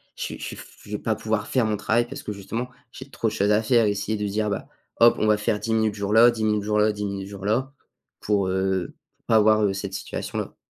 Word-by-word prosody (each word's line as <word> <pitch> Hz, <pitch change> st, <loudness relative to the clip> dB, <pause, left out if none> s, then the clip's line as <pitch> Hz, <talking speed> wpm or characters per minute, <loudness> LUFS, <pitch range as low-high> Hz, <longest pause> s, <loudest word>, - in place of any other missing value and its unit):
je -, -, -5 dB
suis -, -, -5 dB
je -, -, -8 dB
suis -, -, -5 dB
f -, -, -11 dB, 0.2 s
je 105 Hz, -, -12 dB
vais -, -, 0 dB
pas 110 Hz, -, 0 dB
pouvoir 110 Hz, 0 st, -2 dB
faire 125 Hz, -3 st, +1 dB
mon 105 Hz, -1 st, 0 dB
travail 110 Hz, +3 st, +1 dB
parce -, -, -8 dB
que 105 Hz, -, -4 dB
justement, 115 Hz, +5 st, -5 dB, 0.2 s
j'ai 130 Hz, -, -10 dB
trop 115 Hz, -, -1 dB
de 105 Hz, -, -1 dB
choses 100 Hz, 0 st, +1 dB
à 105 Hz, +1 st, +4 dB
faire 115 Hz, 0 st, +4 dB
et 105 Hz, -, +2 dB
essayer 100 Hz, +2 st, -2 dB
de 105 Hz, -, -2 dB
se -, -, -4 dB
dire: 105 Hz, +1 st, 0 dB
«Ben 100 Hz, -, -3 dB, 0.3 s
hop, 115 Hz, 0 st, +7 dB
on 110 Hz, -, +2 dB
va 105 Hz, 0 st, +4 dB
faire 105 Hz, 0 st, -1 dB
10 115 Hz, -, -2 dB
minutes 110 Hz, -1 st, +2 dB
jour-là, 105 Hz, +4 st, +5 dB
10 115 Hz, -2 st, -4 dB
minutes 105 Hz, -1 st, +1 dB
jour 105 Hz, +1 st, +1 dB
là, 105 Hz, +1 st, +4 dB
10 105 Hz, 0 st, -4 dB
minutes 100 Hz, -1 st, -4 dB
jour-là», 105 Hz, +7 st, -2 dB, 0.5 s
pour, 100 Hz, -2 st, +1 dB
heu, 95 Hz, -1 st, -1 dB, 0.2 s
pour -, -, -46 dB
pas -, -, +3 dB
avoir, 110 Hz, 0 st, +5 dB
heu, 100 Hz, -2 st, +2 dB
cette 95 Hz, 0 st, -5 dB
situation-là. 95 Hz, -, -5 dB
105 Hz, 275 wpm, -24 LUFS, 100-110 Hz, 0.5 s, hop